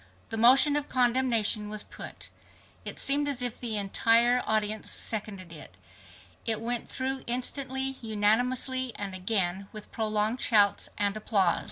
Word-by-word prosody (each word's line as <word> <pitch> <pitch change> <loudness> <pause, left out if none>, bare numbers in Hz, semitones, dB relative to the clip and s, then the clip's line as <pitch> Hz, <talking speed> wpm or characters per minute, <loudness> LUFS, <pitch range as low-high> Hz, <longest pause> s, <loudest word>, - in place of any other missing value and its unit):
The 225 - -3
motion 260 +6 +6
of 295 -1 -2
condemnation 240 -4 +2
was 215 0 -2
put. - - -9 0.6
It - - -4
seemed 290 +1 0
as 255 -3 -2
if 245 -2 -2
the 225 -3 -1
entire 230 +5 +3
audience 215 0 0
seconded 200 -5 -4
it. 120 - -12 0.7
It 220 -1 +1
went 235 +1 -2
through 265 0 -2
instantly, 265 +2 -2
unanimously, 245 +4 +1
and 200 -2 -5
again 185 0 -1
with 215 -1 -9
prolonged 215 +2 -1
shouts 205 -3 +3
and 205 0 0
applause. 200 -5 +1
225 Hz, 140 wpm, -28 LUFS, 210-255 Hz, 0.7 s, motion